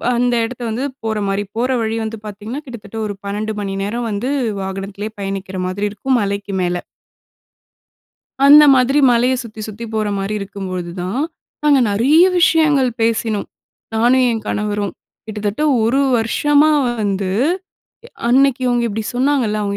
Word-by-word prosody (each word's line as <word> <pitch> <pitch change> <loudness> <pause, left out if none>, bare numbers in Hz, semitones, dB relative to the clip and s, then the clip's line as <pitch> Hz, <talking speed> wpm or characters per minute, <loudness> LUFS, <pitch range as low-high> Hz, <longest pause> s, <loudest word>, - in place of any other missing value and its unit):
அந்த 245 0 +2
இடத்த 245 +1 -8
வந்து, 230 +5 -2 0.2
போற 220 -1 -1
மாரி. 195 +1 -1
போற 250 +2 +1
வழி 225 0 -1
வந்து 220 0 -4
பாத்தீங்கன்னா 215 +7 -6
கிட்டத்தட்ட 225 -4 -9
ஒரு 205 - -3
12 210 +2 -3
மணி 195 -1 -3
நேரம் 230 +3 -3
வந்து 220 +6 -2 0.3
வாகனத்திலயே 195 +2 -5
பயணிக்கிற 195 -1 -4
மாதிரி 200 +3 -2
இருக்கும். 250 +5 0
மலைக்கு 200 0 -3
மேல. 175 0 0 1.7
அந்த 300 +1 +9
மாதிரி 260 +3 +3
மலைய 245 +2 +3
சுத்தி, 220 -1 -10
சுத்தி 215 +3 -7
போற 215 -1 0
மாரி 195 +2 -2
இருக்கும்போதுதான், 185 +2 -4 0.4
நாங்க 290 -2 +4
நெறைய 280 - +5 0.2
விஷயங்கள் 305 -6 +4
பேசினோம். 225 -2 0 0.5
நானும் 245 +3 +4
என் 225 -2 -2
கணவரும் 205 -2 -2 0.3
கிட்டத்தட்ட 210 +4 -3 0.2
ஒரு 245 +5 +2 0.2
வருஷமா 290 +7 +3 0.3
வந்து 195 -2 -1 1.0
அன்னைக்கு 270 +1 +4
இவங்க 245 -1 +1
இப்படி 215 +1 -4
சொன்னாங்கல்ல, 255 -5 +1
அவங்க 200 0 -2
220 Hz, 135 wpm, -18 LUFS, 200-250 Hz, 1.7 s, அந்த